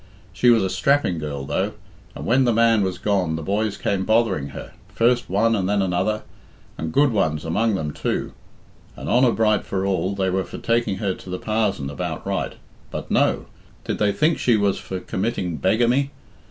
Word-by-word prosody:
She 125 - +3
was 115 -4 +5
a 95 - 0
strapping 140 - +2
girl, 70 -3 -4
though, 75 +1 -1 0.4
and - - -6
when 130 +3 +3
the 120 - +3
man 115 -1 +4
was 95 -2 -1
gone 95 -6 0
the 80 - -5
boys 100 +3 -1
came 95 -2 -1
bothering 110 -9 +2
her, 70 - -9 0.2
first 120 +1 +2
one 115 +5 +2
and 95 -2 -1
then 105 0 +2
another, 95 +4 0 0.5
and 80 0 -4
good 140 - +4
ones 80 -8 0
among 105 +6 +1
them 75 -5 -3
too. - - -2 0.6
And - - -7
honour 125 0 +4
bright 110 -2 +2
for 95 0 -2
all, 100 0 0
they 95 -1 0
were 95 +1 0
for - - -9
taking 115 -4 0
her 100 -2 -1
to 90 - -12
the 90 - -3
parzon 100 -10 -1
about 70 - -4
right - - -2 0.4
But - - -6
no! - - +2 0.4
Did - - -3
they 105 -1 +3
think 155 +12 +1
she 120 -3 +3
was 100 -2 +1
for 95 - -5
committing 95 -4 -2
beggamy? 120 - +2
100 Hz, 195 wpm, -22 LUFS, 90-115 Hz, 0.6 s, was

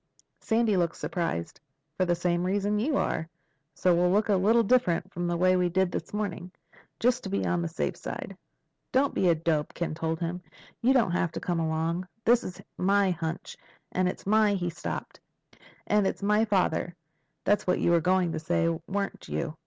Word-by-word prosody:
Sandy 225 -3 +1
looked 170 -2 +1
surprised. 165 - -3 0.4
"For 185 - +1
the 175 -1 +2
same 175 0 0
reason 205 +2 0
you 275 +6 +1
are. 160 - -1 0.5
So 180 - +3
we'll 175 +1 +3
look 205 +3 +2
a 205 - +4
little 220 +5 +4
different 195 -6 +1
from 175 0 -2
the 175 0 0
way 185 +1 +4
we 180 -1 +2
did 190 +1 +1
this - - -4
morning—just 210 +4 -3
to 195 - -5
be 200 - -1
on 175 -1 +1
the 170 - -1
safe 165 - -2
side." - - -6 0.6
"Don't 270 +2 +2
be 185 - +2
a 170 - +4
dope," 155 -2 -1
Ken 170 -2 -2
told 160 0 -2
him. 175 +1 -3 0.4
"You 245 - +4
don't 240 -9 +3
have 170 -2 0
to - - -4
come 175 -2 -1
along. 165 +3 -1 0.2
This 240 +1 +4
is 180 +1 -7 0.2
my 195 0 +3
hunch. 165 -1 -4 0.4
And 185 0 +1
it's - - -7
my—" 210 0 +4
He 175 -2 -2
stopped. 170 - -6 0.7
"'And 210 -2 +2
it's - - -3
my 210 +2 +3
father.' 180 -4 0 0.5
That's 205 -1 +1
what 180 - +2
you - - +2
were 170 -1 +4
going 180 0 +2
to - - -3
say. 165 +1 +1 0.2
Weren't 200 0 -3
you?" 165 -2 -3
180 Hz, 190 wpm, -28 LUFS, 170-205 Hz, 0.7 s, a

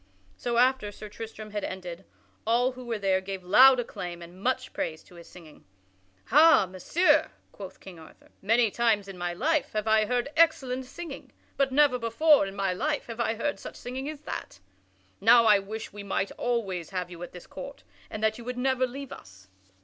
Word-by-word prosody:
So 240 -1 -2
after 250 -4 +3
Sir 210 +1 -10
Tristram 215 -1 -9
had 210 0 -3
ended, 180 -2 -6 0.4
all 245 +3 +3
who 255 0 -11
were 230 -2 -2
there 190 -2 +1
gave 190 -1 -6
loud 255 +8 +7
acclaim 175 -7 -6
and 175 +2 -13
much 255 +2 -1
praise 160 -1 -4
to - - -20
his 170 -1 -13
singing. 165 -4 -15 0.6
"Ha, 305 -3 +6
Messire!" 190 - +2 0.2
quoth 190 -2 -10
King 180 -4 -12
Arthur, 160 - -17
"many 225 +2 +3
times 220 -4 +1
in 195 - -8
my 175 -1 -3
life 300 - 0
have 215 0 -2
I 220 0 +4
heard 245 +2 0
excellent 265 -6 +2
singing, 335 +6 -9 0.2
but 275 -1 +1
never 275 -2 +4
before 235 +2 +4
in 195 - -8
my 195 -2 0
life 295 +10 -2
have 230 0 -8
I 230 -1 0
heard 285 +6 -2
such - - -9
singing 260 +3 -5
as 305 -2 -8
that. 300 - -7 0.6
Now 230 +2 +6
I 210 -2 +6
wish 215 +3 -7
that - - -31
we 205 - -8
might 200 0 -2
always 195 -8 -2
have 180 -2 -4
you 170 -1 -10
at 175 - -7
this 180 - -11
court 275 +1 -9 0.3
and 215 - -6
that 220 +1 +1
you - - -9
would 250 +1 -5
never 260 0 +1
leave 275 +2 -8
us." 95 0 -13
225 Hz, 200 wpm, -27 LUFS, 190-255 Hz, 0.6 s, loud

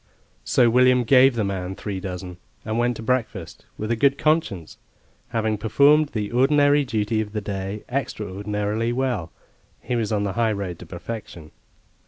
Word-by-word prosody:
So 120 - +3
William 125 +1 +4
gave 130 +2 +5
the 110 - 0
man 95 -1 -3
three 100 -2 -5
dozen 90 -1 -6 0.3
and 110 +1 -1
went 120 0 +1
to 115 - -7
breakfast 110 -8 -3
with 110 +2 -3
a - - +2
good 140 +4 +3
conscience; 150 - -1 0.5
having 110 -2 -1
performed 140 +7 +4
the 105 -5 -3
ordinary 145 +3 +4
duty 110 -3 -1
of 105 -1 -6
the 105 - -1
day 100 0 -5
extraordinarily 105 -2 -2
well, 125 -10 -2 0.5
he 125 - -3
was 115 -2 -1
on 105 -1 0
the 100 -2 -2
high 115 -2 +1
road 95 -4 -5
to - - -11
perfection. 95 -8 -8
110 Hz, 165 wpm, -23 LUFS, 100-125 Hz, 0.5 s, gave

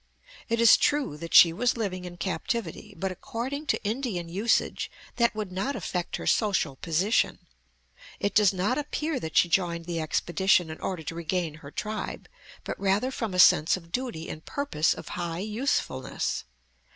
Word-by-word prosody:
It 230 0 +1
is 230 -1 +8
true 290 - +1
that 165 +2 -4
she 165 -2 +9
was 245 +7 +1
living 185 -5 -3
in 175 0 -8
captivity, 195 +3 -3
but 190 -1 -2
according 270 - -5
to - - 0
Indian 215 -5 -2
usage 205 +7 0 0.3
that 235 -2 +3
would 210 -3 -4
not 195 +10 -2
affect 180 -2 -3
her - - -6
social 195 - +1
position. 170 - +1 0.8
It 205 - -1
does 210 -3 +5
not 200 +8 0
appear 300 0 -2
that 160 -6 -4
she - - +6
joined 170 -1 0
the 170 -1 -2
expedition 175 +2 +2
in 155 - -8
order 180 -4 -3
to 155 - -5
regain 170 0 -2
her 140 - -9
tribe, 215 +7 -5 0.4
but - - -5
rather 200 +6 +1
from 225 -7 -3
a - - -1
sense 165 -2 +6
of 165 -2 -14
duty 240 -10 -3
and 155 - -7
purpose 280 - 0
of - - -9
high 170 -1 -3
usefulness. 215 - -2
190 Hz, 170 wpm, -27 LUFS, 170-230 Hz, 0.8 s, she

